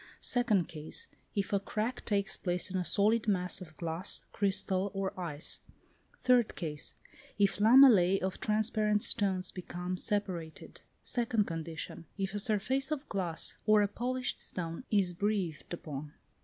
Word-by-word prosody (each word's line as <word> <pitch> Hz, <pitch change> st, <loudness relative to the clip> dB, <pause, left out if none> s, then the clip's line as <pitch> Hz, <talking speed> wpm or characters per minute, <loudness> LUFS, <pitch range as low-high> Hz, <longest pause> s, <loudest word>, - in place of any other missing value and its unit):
Second 220 Hz, -8 st, +2 dB
case: 155 Hz, -1 st, -4 dB, 0.3 s
if 200 Hz, +1 st, -1 dB
a 200 Hz, -, +3 dB
crack 220 Hz, +5 st, -3 dB
takes 200 Hz, -1 st, +2 dB
place 180 Hz, 0 st, -2 dB
in 190 Hz, -, -1 dB
a 180 Hz, -, 0 dB
solid 215 Hz, +5 st, +2 dB
mass 180 Hz, -2 st, 0 dB
of 155 Hz, -4 st, -11 dB
glass, 170 Hz, +2 st, -2 dB
chrystal, 195 Hz, -1 st, 0 dB
or 195 Hz, -1 st, -2 dB
ice. 155 Hz, -4 st, -3 dB, 0.6 s
Third 250 Hz, -3 st, +4 dB
case: 150 Hz, -4 st, -5 dB, 0.4 s
if 200 Hz, -1 st, +3 dB
lamellæ 210 Hz, -4 st, +7 dB
of 190 Hz, 0 st, -2 dB
transparent 215 Hz, -1 st, +1 dB
stones 190 Hz, -3 st, +1 dB
become 180 Hz, 0 st, -5 dB
separated. 180 Hz, -6 st, -2 dB, 0.2 s
Second 230 Hz, -4 st, +1 dB
condition. 165 Hz, -1 st, -6 dB
If 195 Hz, 0 st, -2 dB
a 205 Hz, -, -1 dB
surface 220 Hz, +6 st, +1 dB
of 300 Hz, -2 st, -3 dB
glass 175 Hz, -5 st, -1 dB
or 215 Hz, -1 st, +6 dB
a -, -, +2 dB
polished 250 Hz, +5 st, -2 dB
stone 165 Hz, +5 st, -3 dB
is 195 Hz, -4 st, +2 dB
breathed 190 Hz, -5 st, -2 dB
upon. 150 Hz, -3 st, -6 dB
195 Hz, 140 wpm, -32 LUFS, 175-215 Hz, 0.6 s, lamellæ